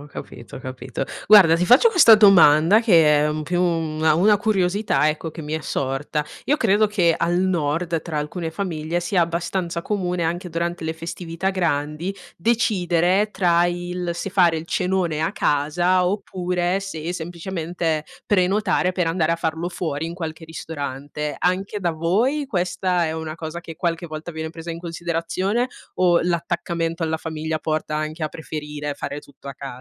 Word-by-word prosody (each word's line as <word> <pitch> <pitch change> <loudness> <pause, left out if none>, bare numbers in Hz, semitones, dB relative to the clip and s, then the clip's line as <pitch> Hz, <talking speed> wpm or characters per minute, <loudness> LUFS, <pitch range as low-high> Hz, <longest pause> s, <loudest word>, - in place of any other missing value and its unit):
ho 145 - -11
capito, 115 - -9
ho - - -6
capito. 130 0 -5 0.2
Guarda, 190 -6 +8
ti 170 +2 +1
faccio 250 - +6
questa 325 - +7
domanda 190 -2 +6
che 160 -9 +5
è - - 0
più 175 +3 -1
una 160 -2 +1
una 205 +4 +5
curiosità, 195 -7 +1
ecco, 155 +1 -3
che 165 - -9
mi 150 0 -6
è 160 - -1
sorta: 145 +2 -2 0.2
io 295 - +3
credo 215 -7 +3
che 180 -5 +2
al 175 +1 0
nord 165 -2 0
tra 160 -3 -4
alcune 160 +3 -4
famiglie, 165 -2 -3
sia 175 +1 0
abbastanza 170 +1 -1
comune 180 -3 -2
anche 175 +2 -2
durante 170 +1 -3
le 160 0 -3
festività 165 +2 -4
grandi 165 -1 -1 0.2
decidere 190 -2 +1
tra 175 -3 +3
il: 175 0 -3
se 185 +3 -4
fare 180 -3 +4
il 160 +1 -6
cenone 180 -4 0
a 160 - 0
casa 175 +6 +1
oppure 180 -1 -1
se 175 -3 -5
semplicemente 170 -2 -3 0.2
prenotare 190 -1 +2
per 180 -2 -1
andare 165 -1 +1
a 165 - +1
farlo 165 +1 -2
fuori 160 -3 -3
in 170 - -6
qualche 160 -2 -6
ristorante. 145 -2 -5
Anche 190 +3 0
da 175 -4 -1
voi 220 - 0
questa 180 -2 0
è 160 - -2
una 160 0 -5
cosa 165 +1 -6
che 165 -2 -10
qualche 170 0 -2
volta 155 +2 -7
viene 160 0 -5
presa 165 +1 -7
in 165 - -7
considerazione, 175 +7 -2 0.3
o 175 -2 +4
l'attaccamento 170 -1 -2
alla 160 0 -1
famiglia 160 0 -4
porta 155 -1 -2
anche 155 +1 -3
a - - -1
preferire 150 -2 -6
fare 145 +1 -5
tutto 145 -1 -18
a 140 - -4
casa? 140 - -8
170 Hz, 165 wpm, -22 LUFS, 160-185 Hz, 0.3 s, Guarda